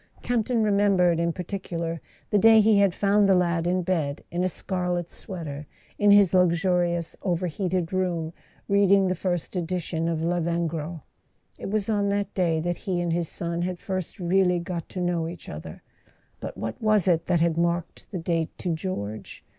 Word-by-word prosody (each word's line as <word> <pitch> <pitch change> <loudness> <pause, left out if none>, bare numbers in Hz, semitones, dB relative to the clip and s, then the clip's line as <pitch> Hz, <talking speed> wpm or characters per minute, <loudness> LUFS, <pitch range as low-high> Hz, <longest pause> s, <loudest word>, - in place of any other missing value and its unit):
Camp 240 -3 0
ton 235 -3 +1
remembered 200 -5 +3
in 170 0 +1
par¬ 180 +1 -6
ticular 170 -3 -4 0.3
the 210 - +4
day 225 +1 +7
he 215 -1 +5
had 200 -3 +3
found 200 0 +3
the 190 - +6
lad 170 -2 +1
in 180 +1 +1
bed, 160 -6 -1
in 175 +1 -1
a 185 - +1
scarlet 180 -1 -3
sweater, 150 -6 -7 0.3
in 205 - +4
his 200 -3 +6
luxurious 175 -1 +2
overheated 180 0 -1
room, 175 -3 -1 0.3
reading 200 -1 +4
the 185 - +1
first 180 0 -3
edition 170 -2 -2
of 160 -1 -1
Lavengro. 170 -2 -2 0.6
It - - -5
was 210 -1 0
on 205 -2 +1
that 200 0 -1
day 170 -4 +1
that 175 +1 -2
he 185 -4 -2
and 175 -1 0
his 170 -1 -1
son 170 0 -3
had 180 0 -2
first 185 -2 -4
really 180 0 +2
got 170 -1 -5
to 185 - -6
know 175 -2 0
each 170 -1 -9
other; 80 +1 -8 0.6
but - - -7
what 110 0 -5
was 215 -4 +3
it 165 -2 +2
that 175 - +2
had 165 -1 +2
marked 170 0 -2
the 190 - -4
date 165 -1 -2
to 175 -3 -2
George 110 - -5
175 Hz, 180 wpm, -25 LUFS, 170-190 Hz, 0.6 s, day